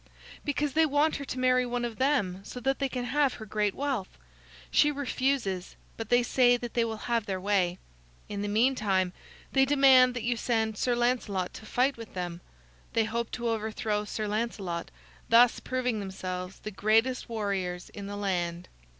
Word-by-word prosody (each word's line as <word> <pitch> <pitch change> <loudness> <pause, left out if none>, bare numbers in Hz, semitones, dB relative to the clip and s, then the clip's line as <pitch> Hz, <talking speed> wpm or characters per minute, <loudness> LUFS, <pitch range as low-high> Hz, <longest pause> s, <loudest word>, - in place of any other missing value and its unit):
"Because 290 -1 -1
they 320 +1 +4
want 295 +2 +2
her 280 - -6
to 255 - -5
marry 255 0 +3
one 245 0 -2
of 230 -2 -5
them 250 -10 +1
so 250 - -7
that 270 +2 0
they 275 -1 0
can 250 -2 -3
have 280 +1 +1
her 220 - -8
great 210 -1 0
wealth. 270 -8 -3 0.5
She 295 - +5
refuses, 260 -8 -1 0.2
but 225 -1 -6
they 245 0 +4
say 245 0 +4
that 240 -1 -7
they 235 - +2
will 225 -1 -3
have 235 -3 0
their 190 -2 -2
way. 185 -2 +1 0.5
In 205 -1 -4
the 205 - -2
meantime, 205 -5 +2 0.4
they 270 - +4
demand 265 -2 +6
that 245 - -3
you 240 +1 +1
send 220 -2 0
Sir 245 +3 +1
Lancelot 240 -7 0
to 215 - -10
fight 260 +4 +1
with 230 -4 -10
them. 175 -1 -4 0.5
They 225 - +3
hope 230 +1 -2
to 235 -1 -2
overthrow 215 -1 -1
Sir 215 0 -4
Lancelot, 205 -5 -3 0.4
thus 235 +1 +6
proving 250 -3 -1
themselves 185 -1 -5
the 215 - -6
greatest 225 +6 +1
warriors 195 -5 -2
in 200 -1 -7
the 205 0 -5
land. 175 -3 -2
230 Hz, 180 wpm, -29 LUFS, 200-255 Hz, 0.5 s, demand